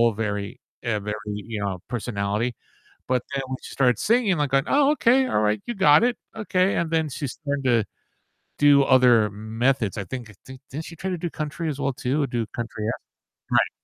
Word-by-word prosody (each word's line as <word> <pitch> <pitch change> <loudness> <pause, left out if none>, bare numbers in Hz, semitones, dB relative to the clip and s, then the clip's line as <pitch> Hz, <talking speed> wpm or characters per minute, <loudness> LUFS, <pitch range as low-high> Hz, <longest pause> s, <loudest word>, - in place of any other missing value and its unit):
very, 105 -2 -3 0.2
uh 110 -3 0
very, 105 +1 -4 0.2
you 105 +1 -5
know, 100 -2 -2
personality. 115 0 -2 0.5
But 125 -2 +1
then 135 -1 -1
when 130 0 -4
she - - -9
started 125 -4 +2
singing, 225 -4 +2
like 145 -3 0
going, 135 0 +3
"Oh, 285 0 +4
okay, 265 -2 +3
all - - +1
right, 105 0 +1
you 240 - -3
got 150 -1 +6
it. 245 0 +2 0.2
Okay," 195 -3 +1
and 170 -1 -1
then 160 -1 +1
she 140 +1 -4
started 145 0 -4
to 120 -4 +3 0.7
do 145 -1 +6
other 125 -5 +5
m 110 +2 -8
methods, 125 -5 +1
I 105 - -3
think 120 +3 -6
I 105 - -15
think, 130 0 -11
didn't 155 +4 -6
she 165 - -10
try 190 +4 -4
to 180 - -2
do 170 +1 -3
country 155 +2 -4
as 145 -2 -3
well 140 -1 0
too, 130 +4 -1
or - - +1
do 120 -2 -2
country 110 -1 -6
act? - - -3 0.5
Right. - - +3
130 Hz, 215 wpm, -24 LUFS, 110-160 Hz, 0.7 s, got